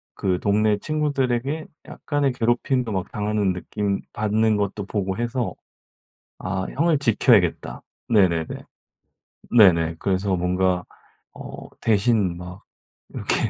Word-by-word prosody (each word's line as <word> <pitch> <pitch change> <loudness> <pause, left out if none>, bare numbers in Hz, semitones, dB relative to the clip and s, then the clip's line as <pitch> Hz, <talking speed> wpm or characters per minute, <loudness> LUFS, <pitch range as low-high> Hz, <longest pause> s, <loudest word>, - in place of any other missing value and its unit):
그 90 -2 0
동네 105 +1 +2
친구들에게 145 -1 -1 0.2
약간의 145 -3 -1
괴롭힘도 120 0 0
막 95 -2 -3
당하는 105 -2 0
느낌 100 +2 -3
받는 110 0 +1
것도 100 0 -2
보고 95 -2 -2
해서 120 0 -2 0.9
'아 95 0 -3
형을 160 +1 +3
지켜야겠다.' 120 -6 +2 0.3
네네네. 90 -7 +3 1.1
네네. 85 -6 +5
그래서 95 -1 0
뭔가 90 0 0 0.5
어 - - -9
대신 105 -4 +2
막 90 +1 -10 0.5
이렇게 - - 0
105 Hz, 240 characters per minute, -23 LUFS, 95-120 Hz, 1.1 s, 네네